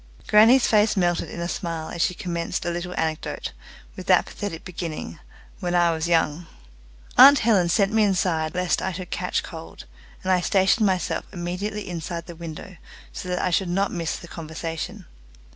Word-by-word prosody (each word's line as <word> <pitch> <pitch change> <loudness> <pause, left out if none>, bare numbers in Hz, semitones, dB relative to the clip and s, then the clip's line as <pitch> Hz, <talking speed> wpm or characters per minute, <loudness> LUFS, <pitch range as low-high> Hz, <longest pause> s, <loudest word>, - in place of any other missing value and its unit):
Grannie's 230 +5 +6
face 215 -1 +3
melted 175 -2 +1
in - - -7
a 170 - -2
smile 165 -3 -4
as 170 - -4
she 180 - +1
commenced 170 -2 -3
a 175 - 0
little 175 +1 -4
anecdote, 160 0 -3 0.4
with - - -9
that - - +5
pathetic 195 -6 -6
beginning, 160 - -6 0.4
"When 175 0 -1
I 175 -1 +4
was 160 0 -2
young." 165 -1 +1 0.7
Aunt 280 +3 +10
Helen 195 -7 +4
sent 200 +3 +2
me 220 - +4
inside 180 -5 +1
lest 180 -1 +1
I 190 - -2
should 180 0 -7
catch 180 0 -1
cold, 165 -1 -10 0.4
and 190 - 0
I 180 -1 +3
stationed 195 +4 +3
myself 185 -2 -1
immediately 195 +4 -4
inside 170 -1 -5
the 175 - -9
window 170 +3 -8 0.4
so 180 - -6
that 180 - -1
I 180 - 0
should 180 +1 +1
not 195 +3 0
miss 165 -2 -2
the 170 - -9
conversation. 165 0 -6
175 Hz, 175 wpm, -24 LUFS, 165-190 Hz, 0.7 s, Aunt